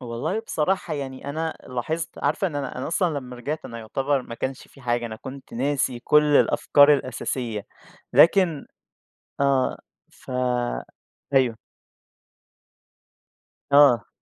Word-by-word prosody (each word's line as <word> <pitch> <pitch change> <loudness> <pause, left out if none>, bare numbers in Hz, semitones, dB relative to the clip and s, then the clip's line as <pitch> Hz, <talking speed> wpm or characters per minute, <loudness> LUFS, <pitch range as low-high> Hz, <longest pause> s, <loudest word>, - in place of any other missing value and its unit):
والله 120 - -3
بصراحة 190 -5 -1
يعني 135 -1 -5
أنا 160 +2 -3
لاحظت 155 +7 -3
عارفة 195 - +1
إن 155 -6 -4
أنا 140 -2 -4
أنا 130 - -3
أصلًا 165 -2 0
لمّا 125 -2 -9
رجعت 145 +6 -4
أنا 115 - -7
يُعتبر 135 +4 -1
ما 115 - -8
كانش 130 +2 -5
في 140 - -18
حاجة 120 -1 -1
أنا 110 -1 -7
كنت 130 +3 -10
ناسي 130 -1 0
كل 150 +4 +4
الأفكار 145 +1 +5
الأساسية 120 -5 -3 0.5
لكن 170 -4 +4 0.7
آه، 135 -2 +2 0.3
ف - - -13 1.0
أيوه. 125 -4 +3 2.2
آه. 140 -6 +6
135 Hz, 120 wpm, -24 LUFS, 125-150 Hz, 2.2 s, آه